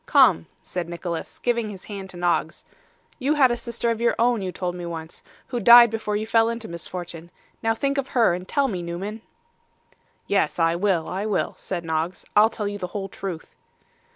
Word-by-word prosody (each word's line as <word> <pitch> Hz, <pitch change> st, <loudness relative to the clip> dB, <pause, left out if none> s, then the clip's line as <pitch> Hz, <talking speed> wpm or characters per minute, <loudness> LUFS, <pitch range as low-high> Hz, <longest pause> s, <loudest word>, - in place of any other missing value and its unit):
Come,' 80 Hz, -, +5 dB, 0.2 s
said 175 Hz, -2 st, -4 dB
Nicholas, 170 Hz, -1 st, -5 dB
giving 235 Hz, -3 st, 0 dB
his 195 Hz, -2 st, -9 dB
hand 195 Hz, -2 st, -7 dB
to 180 Hz, -, -9 dB
Noggs. 175 Hz, 0 st, 0 dB, 0.5 s
'You 285 Hz, +3 st, +1 dB
had 265 Hz, -4 st, +5 dB
a -, -, +1 dB
sister 235 Hz, 0 st, -2 dB
of 230 Hz, 0 st, -3 dB
your 235 Hz, -, +2 dB
own, 235 Hz, -2 st, +2 dB
you 185 Hz, -1 st, -3 dB
told 180 Hz, -1 st, -3 dB
me 175 Hz, 0 st, -7 dB
once, 165 Hz, -1 st, -6 dB, 0.3 s
who 245 Hz, -, -2 dB
died 235 Hz, +1 st, +9 dB
before 215 Hz, -2 st, -2 dB
you 215 Hz, +1 st, -1 dB
fell 225 Hz, 0 st, +3 dB
into 230 Hz, -1 st, -5 dB
misfortune. 170 Hz, 0 st, -7 dB, 0.3 s
Now 225 Hz, -1 st, +1 dB
think 275 Hz, +3 st, 0 dB
of 270 Hz, -, -2 dB
her, 225 Hz, -7 st, +5 dB
and 180 Hz, +1 st, -5 dB
tell 280 Hz, -1 st, +1 dB
me, 190 Hz, -8 st, -3 dB
Newman.' 190 Hz, +6 st, -5 dB, 1.0 s
'Yes, 195 Hz, -6 st, +1 dB
I 165 Hz, -1 st, +3 dB
will, 180 Hz, -3 st, +1 dB
I 195 Hz, +3 st, -3 dB
will,' 210 Hz, -, 0 dB
said 175 Hz, -3 st, -5 dB
Noggs. 160 Hz, +2 st, -2 dB
'I'll 215 Hz, +2 st, +7 dB
tell 215 Hz, -2 st, -4 dB
you 205 Hz, 0 st, -4 dB
the 180 Hz, -, -3 dB
whole 195 Hz, -1 st, -4 dB
truth. 185 Hz, -4 st, -7 dB
200 Hz, 200 wpm, -24 LUFS, 175-230 Hz, 1.0 s, died